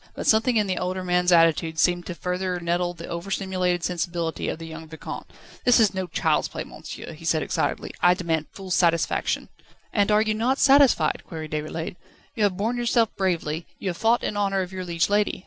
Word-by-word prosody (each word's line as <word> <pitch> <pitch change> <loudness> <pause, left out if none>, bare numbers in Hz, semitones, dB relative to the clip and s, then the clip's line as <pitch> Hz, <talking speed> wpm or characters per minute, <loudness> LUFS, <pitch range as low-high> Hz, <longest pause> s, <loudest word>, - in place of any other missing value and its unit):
But - - -5
something 225 +2 +4
in 210 - +3
the 185 -2 -1
older 185 +1 -2
man's 180 0 +2
attitude 165 -1 +4
seemed 175 +1 +2
to 180 - -5
further 180 +1 -2
nettle 175 +1 -1
the 170 0 -8
over 170 +3 -5
stimulated 185 -3 -1
sensibility 170 -2 -2
of - - -3
the 165 - -8
young 160 0 -9
Vicomte. 160 0 -8 0.3
"This 245 -1 +5
is 220 -3 +4
no 190 -1 -3
child's - - +1
play, - - -5
monsieur," - - -9
he - - -13
said - - +1
excitedly. - - -2
"I 180 0 +5
demand 165 -4 -1
full 190 -2 -9
satisfaction." 170 -2 +1 0.4
"And 205 -1 +2
are 210 +1 +5
you 215 -1 0
not 240 +5 +1
satisfied?" 270 - +4
queried 155 -2 -7
Déroulède. 155 +3 -4 0.4
"You 220 - -5
have 185 -3 0
borne 225 +5 -1
yourself 235 -2 +1
bravely, 170 -4 -1
you 195 - -3
have 175 - -4
fought 230 +4 +2
in - - -2
honour 195 -1 +1
of 180 - -8
your 185 -1 -5
liege 170 -1 +1
lady. 205 +1 +1
180 Hz, 205 wpm, -24 LUFS, 170-205 Hz, 0.4 s, This